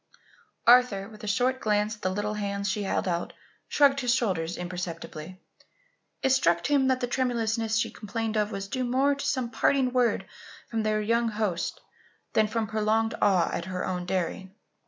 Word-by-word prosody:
Arthur, 235 -5 +5
with 215 -1 -14
a - - -5
short 250 +5 +1
glance 210 -1 +1
at 210 - -22
the 185 - 0
little 205 +2 -2
hands 200 -1 -2
she 205 +2 -1
held 195 -1 -1
out, 170 -1 -2 0.3
shrugged 275 -1 +4
his 245 -2 +2
shoulders 180 -9 -1
imperceptibly. 175 -1 -6 0.8
It 265 - +3
struck 170 -10 +3
him 280 -2 +3
that 260 0 +1
the - - +1
tremulousness 230 -3 0
she 225 - 0
complained 225 +1 -4
of 210 0 +1
was 195 -1 -4
due 255 +5 -2
more 260 +3 +2
to 280 - -5
some 245 -3 -1
parting 260 -2 +2
word 245 -2 +2 0.5
from 225 -1 0
their 215 0 +1
young 230 +2 +1
host, 210 -6 -2 0.5
than 220 -1 +3
from 225 +1 -1
prolonged 220 +1 +1
awe 185 -4 +3
at 170 - -3
her 185 -1 -3
own 180 -1 -3
daring. 190 +1 -3
215 Hz, 175 wpm, -27 LUFS, 190-245 Hz, 0.8 s, Arthur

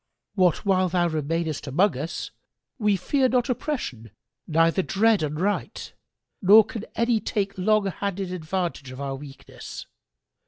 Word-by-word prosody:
What 185 0 +2
while 185 -2 +3
thou 175 -1 +1
remainest 155 -1 -2
amongst 180 +8 +2
us, 155 +6 -5 0.5
we 210 -2 +3
fear 260 +7 +1
not 250 +1 +1
oppression 220 - -4 0.4
neither 165 +3 +3
dread 215 +3 +2
unright, 155 +7 -2 0.5
nor 210 +2 +8
can 225 -2 -7
any 235 -1 +2
take 200 -2 -2
long 210 +2 +2
handed 195 -1 -3
advantage 170 -4 -3
of 130 +1 -9
our 140 -1 -3
weakness! 135 0 -10
185 Hz, 130 wpm, -25 LUFS, 155-210 Hz, 0.5 s, nor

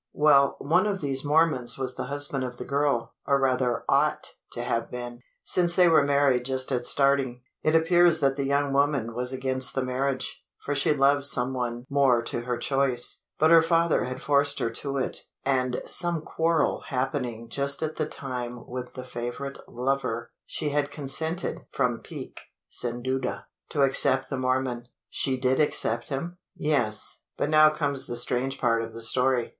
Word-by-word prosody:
"Well 140 -2 +4
one 180 +7 +2
of 200 -2 -2
these 135 -3 -1
Mormons 150 -4 +2
was 130 -1 -3
the - - -5
husband 140 0 +1
of 125 -1 -6
the - - -7
girl, 140 -4 0
or 140 0 +3
rather 130 -2 0
ought - - +1 0.2
to 120 - -4
have 115 -2 -2
been 120 -1 -7 0.2
since 175 -1 +3
they 180 -2 +6
were 160 -3 +5
married 140 -3 +2
just 130 +1 -1
at 125 -2 -1
starting. 135 -3 +1 0.2
It 155 +1 +2
appears 170 0 +4
that 135 -2 +2
the 140 - -2
young 140 0 0
woman 140 -5 +1
was 125 +2 -2
against 130 0 -1
the 135 - 0
marriage 130 +1 -2
for 145 - -4
she 140 +1 +2
loved 140 0 +3
some 130 -1 +2
one 120 -1 -3
more 135 -4 +3
to 120 - -3
her 125 0 -3
choice 135 -3 +1 0.2
but 155 +1 +4
her 165 -1 +8
father 165 0 +2
had 130 0 -6
forced 140 +1 +2
her 115 - -1
to 140 +4 -1
it; 130 - -1 0.3
and 130 -2 0
some 170 -3 +2
quarrel 165 0 0
happening 125 -3 -3
just 140 +3 -1
at 155 0 -3
the 155 - -1
time 125 -4 -6
with 125 0 -7
the 130 - -6
favourite 125 +3 -6
lover, 120 -2 -2 0.2
she 150 - -2
had 145 0 0
consented 150 +4 -3
from - - 0
pique, - - -9 0.3
sin 120 0 -3
duda 130 +1 -2 0.3
to 145 - +1
accept 135 0 +4
the 135 - -2
Mormon." 130 -2 -1 0.2
"She 130 -1 0
did 130 0 +1
accept 120 -6 +1
him?" 170 +6 -5 0.2
"Yes 120 -8 0 0.2
but - - -1
now 155 0 +7
comes 145 -3 -2
the 120 - -3
strange 125 +2 -1
part 115 -2 +2
of 115 0 -7
the 115 0 -1
story. 125 +1 +2
135 Hz, 180 wpm, -26 LUFS, 125-145 Hz, 0.3 s, her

